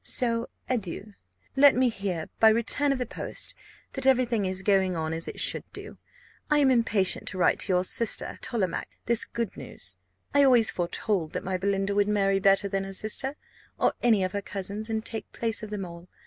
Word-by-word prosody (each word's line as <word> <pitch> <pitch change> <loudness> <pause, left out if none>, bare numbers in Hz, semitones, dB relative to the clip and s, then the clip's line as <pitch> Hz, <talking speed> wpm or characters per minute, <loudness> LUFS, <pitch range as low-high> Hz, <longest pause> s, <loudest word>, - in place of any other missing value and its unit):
So 235 -2 +1 0.2
adieu! 210 -3 -3 0.4
Let 280 0 +7
me 255 0 +3
hear, 195 -7 -3
by 220 - +7
return 235 +6 +2
of 275 - 0
the 250 - -2
post, - - -5 0.4
that 265 -1 -1
every 255 -1 +5
thing 225 -5 -1
is 190 0 -1
going 190 -3 +2
on 160 -1 -2
as 165 +1 -2
it - - -6
should - - 0
do. - - -8 0.5
I 300 - +4
am 280 -2 +4
impatient 220 -6 +2
to - - -4
write 180 - +3
to 190 - +1
your 180 0 +2
sister 225 +4 0
Tollemache 200 -7 -2 0.2
this 235 -1 +3
good 235 -2 -4
news. - - -5 0.4
I 285 0 +5
always 245 -5 +5
foretold 175 -1 -2
that - - -3
my 190 0 -2
Belinda 195 +1 0
would 205 0 +2
marry 195 -2 +2
better 195 +1 +3
than 195 0 -2
her 195 0 -7
sister, 220 +8 0 0.4
or - - +2
any 220 -5 +3
of 185 - -1
her 200 - -3
cousins, 200 +3 -5
and 220 0 -2
take 225 -1 -5
place 225 -1 -2
of 215 - -7
them 205 -2 -4
all. 170 0 -11
205 Hz, 205 wpm, -27 LUFS, 190-235 Hz, 0.5 s, Let